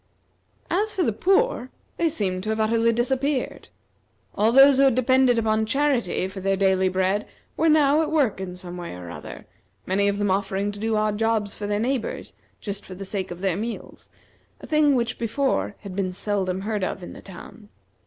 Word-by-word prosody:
As 420 +4 +1
for 380 -3 0
the 225 - +1
poor, 385 - +1 0.3
they 335 - +2
seemed 190 - -1
to 215 - -4
have 220 0 -1
utterly 230 +1 +2
disappeared. 260 +3 -1 0.7
All 215 +2 +2
those 270 +2 +7
who 275 - +5
had 265 -4 +4
depended 255 -1 +3
upon 220 -1 +1
charity 250 -8 +1
for 190 +1 -8
their 195 +1 +1
daily 190 -1 +3
bread 190 +3 0 0.3
were 325 - +2
now 300 0 +4
at 315 - -2
work 270 -11 +1
in 180 -1 -5
some 180 -1 -7
way 175 - -6
or 90 -1 -8
other; - - -9 0.4
many 200 +2 +1
of 200 0 0
them 205 -1 0
offering 195 +1 -1
to 205 - -10
do 220 +1 0
odd 215 -1 0
jobs 225 -2 0
for 205 - -5
their 205 0 0
neighbors 250 +1 -2 0.3
just 200 -1 -5
for 185 - -10
the 195 +1 -7
sake 190 -1 -3
of 175 0 -8
their 190 -3 +1
meals, 225 +4 -6 0.5
a - - -10
thing 305 -2 +3
which 235 -1 -1
before 235 -2 -1
had 195 -3 -8
been 190 -2 -1
seldom 190 -1 -2
heard 210 -1 -2
of 185 - -3
in - - -8
the - - -11
town. 200 +2 -12
215 Hz, 200 wpm, -24 LUFS, 195-260 Hz, 0.7 s, those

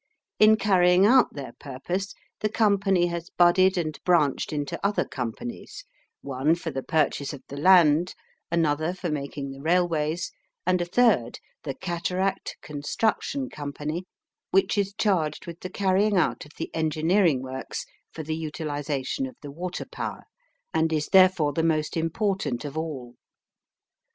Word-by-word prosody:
In 215 0 +7
carrying 185 -3 +4
out 250 +4 +5
their 135 -4 -6
purpose 175 +9 -4 0.2
the 215 - 0
company 195 -4 +2
has 170 0 -4
budded 185 +2 +4
and 155 -3 -2
branched 160 -7 +2
into 145 -2 -4
other 200 +1 +1
companies 235 - -6 0.4
one 140 +4 +1
for 170 -1 -5
the 135 -1 -3
purchase 150 -1 0
of 135 -2 -10
the 140 - -7
land; 170 0 +5 0.4
another 160 +1 +1
for 180 -3 -4
making 140 -1 -4
the 135 0 -10
railways; 165 -1 0 0.3
and 180 0 +2
a - - 0
third, 180 - +2 0.3
the 135 -3 -3
Cataract 185 +4 -2
Construction 215 - -1
Company, 150 - -5 0.4
which 195 +1 +2
is 200 -1 -1
charged 165 -8 0
with 170 0 -8
the 185 - -6
carrying 195 +2 +2
out 180 - +1
of 150 - -17
the - - -5
engineering 160 -1 +2
works, 130 0 -5 0.3
for 160 - -7
the 155 +1 -3
utilisation 150 - -3
of 255 - -12
the 145 - -7
water 175 +5 -5
power, - - -6 0.5
and 160 0 +2
is 155 -1 -1
therefore 185 -6 +5
the 165 - 0
most 155 -2 0
important 165 - -1
of 145 0 -6
all. 145 -7 -5
165 Hz, 145 wpm, -26 LUFS, 145-190 Hz, 0.5 s, In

